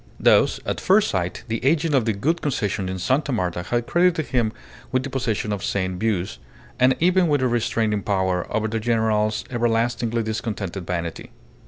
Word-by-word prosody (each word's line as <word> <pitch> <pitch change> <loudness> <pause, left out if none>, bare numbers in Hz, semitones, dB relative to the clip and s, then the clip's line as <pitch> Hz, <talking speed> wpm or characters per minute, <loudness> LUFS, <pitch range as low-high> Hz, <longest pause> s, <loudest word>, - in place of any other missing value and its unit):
Thus - - +4
at - - -2
first 205 +2 +4
sight 90 -2 -2
the 115 0 -3
agent 150 +3 +2
of 130 -5 +3
the 110 - +1
Gould 160 +12 0
Concession 105 -9 -1
in 95 - -3
Sta. 135 - 0
Marta 90 -7 -1
had 120 +6 -1
credited 175 -2 +2
him 120 -4 +1 0.4
with 130 0 +1
the 135 - -5
possession 110 -5 -1
of 100 -1 -4
sane 95 -2 -1
views, 95 - -1 0.4
and 130 +1 +5
even 180 +1 +3
with 145 -4 +2
a - - +3
restraining 115 -3 0
power 95 -3 -1
over 110 0 0
the 115 +1 -2
general's 110 -2 +1
everlastingly 115 -1 0
discontented 105 -4 -4
vanity. 85 -2 -4
115 Hz, 175 wpm, -23 LUFS, 100-130 Hz, 0.4 s, and